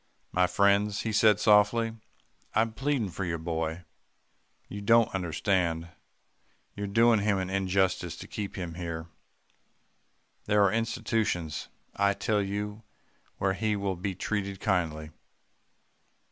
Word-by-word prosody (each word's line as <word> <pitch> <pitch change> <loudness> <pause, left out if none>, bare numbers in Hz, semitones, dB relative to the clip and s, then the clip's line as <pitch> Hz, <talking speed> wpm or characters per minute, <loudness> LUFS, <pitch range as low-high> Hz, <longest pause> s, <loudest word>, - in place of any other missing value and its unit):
"'My 90 0 +3
friends,' 100 +3 +2
he 110 - -2
said 105 -1 +5
softly, 105 +2 +4 0.6
'I'm 110 0 +2
pleading 125 -4 -1
for 95 - -4
your 85 -2 -2
boy. 80 +1 -3 0.8
You 100 - -7
don't 115 +2 +4
understand. 85 -2 0 0.9
You're 100 0 -4
doing 115 +2 +4
him 100 -1 +1
an 95 0 -3
injustice 95 -2 0
to - - -10
keep 100 -2 -5
him 90 -3 -5
here. 85 -2 -5 1.4
There 105 0 +4
are 100 - +3
institutions, 110 - -1 0.3
I 100 0 +2
tell 105 -1 0
you, 105 +2 -4 0.6
where 95 -1 +1
he 105 +2 0
will 100 -1 -2
be 95 +2 -4
treated 100 0 -3
kindly. 80 -7 -1
100 Hz, 125 wpm, -28 LUFS, 90-105 Hz, 1.4 s, said